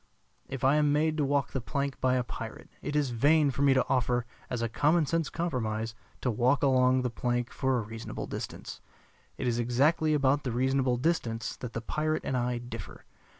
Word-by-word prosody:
If 135 Hz, -1 st, -5 dB
I 135 Hz, +3 st, +5 dB
am 150 Hz, -1 st, +3 dB
made 155 Hz, +2 st, +2 dB
to 150 Hz, -, +2 dB
walk 140 Hz, -1 st, +1 dB
the 135 Hz, -, -2 dB
plank 140 Hz, +2 st, -3 dB
by 130 Hz, 0 st, +3 dB
a 125 Hz, -, +1 dB
pirate, 120 Hz, -, -8 dB
it 145 Hz, -, -4 dB
is 145 Hz, -4 st, +1 dB
vain 145 Hz, +5 st, +4 dB
for 140 Hz, -, -4 dB
me 140 Hz, -1 st, +5 dB
to 130 Hz, -, +2 dB
offer, 125 Hz, -2 st, +1 dB, 0.2 s
as 120 Hz, -2 st, -2 dB
a -, -, +1 dB
common 150 Hz, +8 st, +2 dB
sense 165 Hz, 0 st, 0 dB
compromise, 115 Hz, -9 st, -2 dB, 0.3 s
to 125 Hz, -, +1 dB
walk 125 Hz, +5 st, +2 dB
along 130 Hz, -1 st, +4 dB
the 125 Hz, -, -1 dB
plank 120 Hz, 0 st, -1 dB
for 130 Hz, -2 st, 0 dB
a -, -, 0 dB
reasonable 110 Hz, +1 st, -6 dB
distance. -, -, -7 dB, 0.6 s
It -, -, -2 dB
is 120 Hz, 0 st, +1 dB
exactly 145 Hz, +6 st, +2 dB
about 140 Hz, 0 st, +2 dB
the 125 Hz, -, -2 dB
reasonable 130 Hz, +1 st, +1 dB
distance 120 Hz, -6 st, -1 dB
that 125 Hz, -2 st, -7 dB
the 115 Hz, -, -3 dB
pirate 155 Hz, +6 st, -1 dB
and 130 Hz, -, -1 dB
I 125 Hz, 0 st, 0 dB
differ. 120 Hz, +1 st, -8 dB
130 Hz, 200 wpm, -29 LUFS, 120-145 Hz, 0.6 s, I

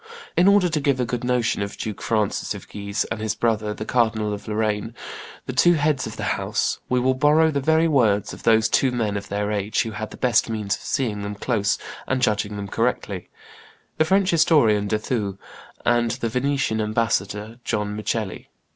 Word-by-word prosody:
In 175 Hz, +2 st, +4 dB
order 200 Hz, -2 st, +5 dB
to 160 Hz, -3 st, -1 dB
give 140 Hz, -2 st, +1 dB
a 125 Hz, -, +1 dB
good 120 Hz, 0 st, -3 dB
notion 125 Hz, -4 st, +1 dB
of 100 Hz, 0 st, -4 dB
Duke 105 Hz, -3 st, -5 dB
Francis 110 Hz, -3 st, -1 dB
of -, -, -10 dB
Guise 100 Hz, 0 st, -3 dB
and 110 Hz, -, -3 dB
his 110 Hz, -1 st, -1 dB
brother 110 Hz, -2 st, 0 dB
the 110 Hz, -, -6 dB
Cardinal 110 Hz, -3 st, +1 dB
of 105 Hz, -, -7 dB
Lorraine, 110 Hz, +1 st, -1 dB, 0.5 s
the -, -, -4 dB
two 175 Hz, -, +5 dB
heads 150 Hz, -4 st, +1 dB
of -, -, -8 dB
the -, -, -4 dB
house, -, -, -1 dB
we 125 Hz, -, +2 dB
will 130 Hz, +1 st, +2 dB
borrow 150 Hz, +4 st, +4 dB
the 140 Hz, -, 0 dB
very 160 Hz, +3 st, +3 dB
words 115 Hz, -9 st, +2 dB
of -, -, -10 dB
those 110 Hz, -1 st, +4 dB
two 135 Hz, -, +3 dB
men 110 Hz, -4 st, -1 dB
of 100 Hz, 0 st, -4 dB
their 105 Hz, +1 st, -1 dB
age 105 Hz, 0 st, 0 dB
who 115 Hz, -, -5 dB
had 110 Hz, 0 st, -5 dB
the -, -, -11 dB
best 120 Hz, -2 st, +2 dB
means 105 Hz, -3 st, -1 dB
of -, -, -13 dB
seeing 115 Hz, -7 st, -1 dB
them 100 Hz, 0 st, -4 dB
close 105 Hz, -1 st, 0 dB, 0.3 s
and 130 Hz, -, 0 dB
judging 105 Hz, -1 st, +1 dB
them 100 Hz, -1 st, -5 dB
correctly, -, -, -2 dB, 0.7 s
the -, -, +6 dB
French 195 Hz, +2 st, +3 dB
historian 115 Hz, -11 st, +4 dB
De 110 Hz, -, +1 dB
Thou 105 Hz, -3 st, -2 dB, 0.5 s
and 120 Hz, -1 st, +3 dB
the 115 Hz, 0 st, -2 dB
Venetian 125 Hz, -2 st, 0 dB
ambassador 105 Hz, 0 st, -1 dB
John 105 Hz, -1 st, -2 dB
Micheli. 110 Hz, -2 st, -3 dB
110 Hz, 200 wpm, -23 LUFS, 105-130 Hz, 0.7 s, the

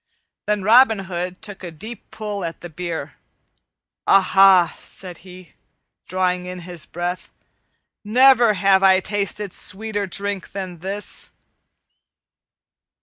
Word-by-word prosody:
Then 210 Hz, -2 st, 0 dB
Robin 225 Hz, +2 st, +6 dB
Hood 180 Hz, 0 st, -5 dB
took 205 Hz, -3 st, -8 dB
a 175 Hz, -, -5 dB
deep 210 Hz, +8 st, -10 dB
pull 210 Hz, -3 st, -5 dB
at 165 Hz, -1 st, -6 dB
the 175 Hz, -, -9 dB
beer. 160 Hz, -4 st, -5 dB, 0.9 s
"Aha!" 190 Hz, -2 st, +5 dB
said 180 Hz, -3 st, -8 dB
he, 180 Hz, -2 st, -14 dB, 0.5 s
drawing 180 Hz, 0 st, -1 dB
in 180 Hz, 0 st, -7 dB
his 175 Hz, -1 st, -6 dB
breath, 175 Hz, +1 st, -4 dB, 0.7 s
"never 240 Hz, 0 st, +5 dB
have 190 Hz, 0 st, +3 dB
I 190 Hz, -1 st, +6 dB
tasted 205 Hz, 0 st, -3 dB
sweeter 205 Hz, 0 st, -3 dB
drink 200 Hz, +1 st, -4 dB
than 185 Hz, -3 st, -6 dB
this." 195 Hz, +4 st, -4 dB
190 Hz, 115 wpm, -21 LUFS, 180-205 Hz, 0.9 s, Robin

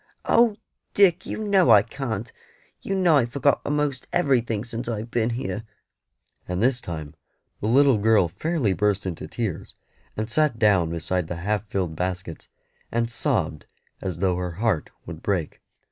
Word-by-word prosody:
"Oh, 230 Hz, -2 st, +4 dB, 0.4 s
Dick, 185 Hz, -3 st, +4 dB
you -, -, -4 dB
know 195 Hz, -4 st, +3 dB
I 100 Hz, -, +8 dB
can't; 115 Hz, -2 st, -5 dB, 0.5 s
you 195 Hz, -, -2 dB
know 175 Hz, -5 st, +4 dB
I've 120 Hz, -4 st, +2 dB
forgot 140 Hz, +2 st, +2 dB
a'most 145 Hz, -2 st, -1 dB
everything 120 Hz, -9 st, +1 dB
since 120 Hz, 0 st, -5 dB
I've 115 Hz, 0 st, -4 dB
been 115 Hz, -1 st, +1 dB
here;" 110 Hz, -4 st, -3 dB, 0.9 s
and 90 Hz, 0 st, -2 dB
this 125 Hz, +3 st, +2 dB
time 80 Hz, -4 st, -6 dB, 0.5 s
the 105 Hz, -, -2 dB
little 135 Hz, 0 st, +5 dB
girl 105 Hz, -3 st, +4 dB
fairly 140 Hz, -, -1 dB
burst 105 Hz, +1 st, 0 dB
into 90 Hz, -4 st, -5 dB
tears, 110 Hz, -8 st, -4 dB, 0.4 s
and 110 Hz, 0 st, -2 dB
sat 145 Hz, +1 st, +1 dB
down 100 Hz, -7 st, +3 dB
beside 85 Hz, +1 st, -2 dB
the 85 Hz, -, -4 dB
half 105 Hz, 0 st, -1 dB
filled 90 Hz, -5 st, -2 dB
baskets, 90 Hz, -1 st, -4 dB, 0.4 s
and 115 Hz, 0 st, 0 dB
sobbed 115 Hz, -, -1 dB, 0.3 s
as 95 Hz, -4 st, -3 dB
though 90 Hz, 0 st, +1 dB
her 90 Hz, -1 st, -3 dB
heart 100 Hz, -3 st, 0 dB, 0.2 s
would 85 Hz, -1 st, -8 dB
break. 95 Hz, -6 st, -2 dB
110 Hz, 160 wpm, -24 LUFS, 95-135 Hz, 0.9 s, I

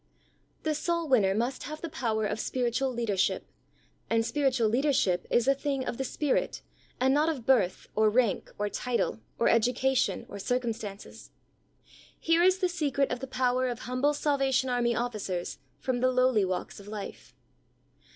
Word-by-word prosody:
The 310 Hz, -, +1 dB
soul 335 Hz, +2 st, -1 dB
winner 205 Hz, -8 st, +3 dB
must 240 Hz, +4 st, -1 dB
have 305 Hz, +1 st, -7 dB
the 335 Hz, -, -3 dB
power 230 Hz, -9 st, -1 dB
of 210 Hz, +1 st, -2 dB
spiritual 255 Hz, +3 st, 0 dB
leadership, 230 Hz, -6 st, 0 dB, 0.6 s
and 225 Hz, 0 st, +2 dB
spiritual 265 Hz, -4 st, +1 dB
leader 265 Hz, +7 st, +2 dB
ship 180 Hz, -9 st, +1 dB
is 240 Hz, +1 st, +2 dB
a 275 Hz, -, +6 dB
thing 275 Hz, -1 st, -2 dB
of 235 Hz, -, -3 dB
the -, -, 0 dB
Spirit, 280 Hz, +2 st, -1 dB, 0.4 s
and 265 Hz, +1 st, +3 dB
not 300 Hz, +3 st, +3 dB
of 270 Hz, -8 st, -4 dB
birth, 210 Hz, -9 st, +2 dB
or 215 Hz, 0 st, +4 dB
rank, 230 Hz, -2 st, +1 dB
or 210 Hz, -, 0 dB
title, 240 Hz, +2 st, -1 dB, 0.2 s
or -, -, +2 dB
education, 250 Hz, +2 st, +2 dB
or 200 Hz, -, -8 dB
cir 250 Hz, +5 st, 0 dB
cumstances. 220 Hz, -4 st, -6 dB, 0.9 s
Here 330 Hz, +1 st, +3 dB
is 370 Hz, +1 st, +5 dB
the 375 Hz, -1 st, +1 dB
secret 290 Hz, -6 st, 0 dB
of 250 Hz, -, -2 dB
the 265 Hz, -, -6 dB
power 255 Hz, 0 st, +1 dB
of 245 Hz, -1 st, -4 dB
humble 255 Hz, +4 st, 0 dB
Salvation 270 Hz, -3 st, +1 dB
Army 240 Hz, -1 st, +1 dB
officers 210 Hz, -7 st, -3 dB, 0.2 s
from 255 Hz, -2 st, -2 dB
the 255 Hz, +1 st, +3 dB
lowly 255 Hz, -5 st, +3 dB
walks 185 Hz, +1 st, -4 dB
of 200 Hz, -, -13 dB
life. 210 Hz, -1 st, -8 dB
250 Hz, 170 wpm, -29 LUFS, 225-275 Hz, 0.9 s, a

